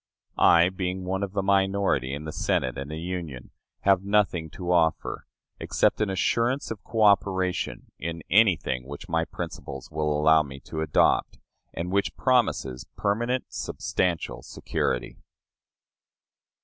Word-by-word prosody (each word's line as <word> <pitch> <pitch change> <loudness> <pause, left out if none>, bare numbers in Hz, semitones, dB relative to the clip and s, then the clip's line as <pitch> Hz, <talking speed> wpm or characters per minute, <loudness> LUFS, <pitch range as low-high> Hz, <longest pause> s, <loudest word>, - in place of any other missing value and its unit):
I, 85 +1 +6
being 95 0 -3
one 95 +1 -2
of 100 -1 -3
the 100 -2 0
minority 95 -8 +2
in 70 +2 -5
the 80 - -4
Senate 65 -4 0
and 70 +1 -6
the 80 - -5
Union, 85 -7 -6 0.3
have 95 -1 +3
nothing 100 -5 +1
to 90 +3 -4
offer, 80 -2 +1 0.3
except - - +1
an 105 - +1
assurance 115 +8 0
of 105 -3 -6
coöperation 100 -4 +1 0.2
in 85 0 -5
anything 85 - +3
which 70 +1 -8
my 80 0 0
principles 70 -5 -7
will 75 0 -1
allow 80 +1 +5
me 70 -2 -8
to 80 - -5
adopt, 80 -2 +2 0.3
and 90 +2 -4
which 100 +1 0
promises 110 - +1
permanent, 120 +5 0
substantial 90 -3 -2
security. - - -3
90 Hz, 135 wpm, -26 LUFS, 75-100 Hz, 0.3 s, I